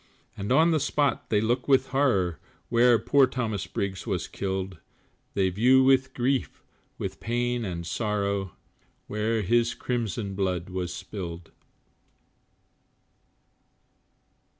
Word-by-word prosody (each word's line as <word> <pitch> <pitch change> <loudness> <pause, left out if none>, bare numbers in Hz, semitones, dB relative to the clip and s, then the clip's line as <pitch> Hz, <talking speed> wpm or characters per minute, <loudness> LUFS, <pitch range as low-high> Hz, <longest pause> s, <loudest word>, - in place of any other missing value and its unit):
And 100 +1 -4
on 160 +5 +5
the 160 - +2
spot 145 -2 0
they 105 - +3
look 120 +4 0
with 135 -1 +3
horror, 100 - +1 0.3
Where 120 0 +5
poor 135 +5 +4
Thomas 115 -7 -3
Briggs 95 -1 -4
was - - -2
killed, 95 -2 -4 0.6
They 95 -1 +2
view 125 +7 +5
with 130 0 +3
grief, 130 +2 -1 0.3
with - - -5
pain 120 +1 -1
and 85 -4 -4
sorrow, 100 -1 -1 0.5
Where 110 +1 -1
his 120 +4 +2
crimson 115 -4 -3
blood 95 -2 -2
was 90 -1 -3
spilled. 90 -3 -7
110 Hz, 115 wpm, -27 LUFS, 95-125 Hz, 0.6 s, on